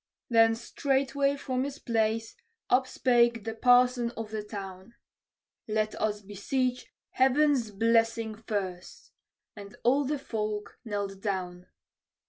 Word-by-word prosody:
Then 225 Hz, -1 st, +5 dB
straightway 275 Hz, +3 st, 0 dB
from 260 Hz, -2 st, -2 dB
his 280 Hz, 0 st, -5 dB
place 225 Hz, -3 st, -1 dB, 0.4 s
upspake 240 Hz, -3 st, +3 dB
the 225 Hz, +1 st, -4 dB
parson 245 Hz, +1 st, +4 dB
of 225 Hz, -1 st, -5 dB
the 215 Hz, -1 st, -3 dB
town: 200 Hz, +1 st, -8 dB, 0.7 s
"Let 215 Hz, 0 st, 0 dB
us 210 Hz, -1 st, -1 dB
beseech 250 Hz, +6 st, -2 dB, 0.2 s
Heaven's 265 Hz, -2 st, +3 dB
blessing 225 Hz, +1 st, +1 dB
first!" 200 Hz, -4 st, -5 dB, 0.4 s
and 200 Hz, -1 st, -10 dB
all 270 Hz, +4 st, +3 dB
the 295 Hz, +2 st, -1 dB
folk 215 Hz, -5 st, -4 dB
knelt 200 Hz, -3 st, -4 dB
down. 180 Hz, -3 st, -3 dB
225 Hz, 110 wpm, -28 LUFS, 210-255 Hz, 0.7 s, Then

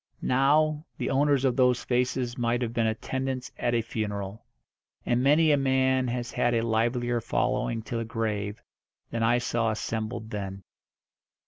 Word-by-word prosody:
Now, 150 Hz, +4 st, +3 dB
the -, -, -2 dB
owners 140 Hz, 0 st, +3 dB
of 125 Hz, -2 st, +2 dB
those 125 Hz, -1 st, +3 dB
faces 125 Hz, 0 st, 0 dB
might 120 Hz, -1 st, 0 dB
have 115 Hz, -1 st, -3 dB
been 115 Hz, -2 st, +1 dB
attendants 130 Hz, +3 st, -3 dB
at 120 Hz, 0 st, +1 dB
a 115 Hz, -, +1 dB
funeral. 105 Hz, -1 st, -4 dB, 0.6 s
And 120 Hz, 0 st, +2 dB
many 150 Hz, +4 st, +5 dB
a 145 Hz, -, +4 dB
man 130 Hz, -1 st, +2 dB
has 120 Hz, 0 st, -3 dB
had 120 Hz, -1 st, +1 dB
a 115 Hz, 0 st, +1 dB
livelier 120 Hz, +1 st, +1 dB
following 115 Hz, 0 st, -1 dB
to 115 Hz, +2 st, -4 dB
the 115 Hz, -, -2 dB
grave 105 Hz, -2 st, -3 dB, 0.5 s
than 115 Hz, -, -2 dB
I 115 Hz, +2 st, +4 dB
saw 120 Hz, -1 st, 0 dB
assembled 110 Hz, +1 st, -3 dB
then. 100 Hz, -1 st, -5 dB
120 Hz, 155 wpm, -27 LUFS, 115-130 Hz, 0.6 s, many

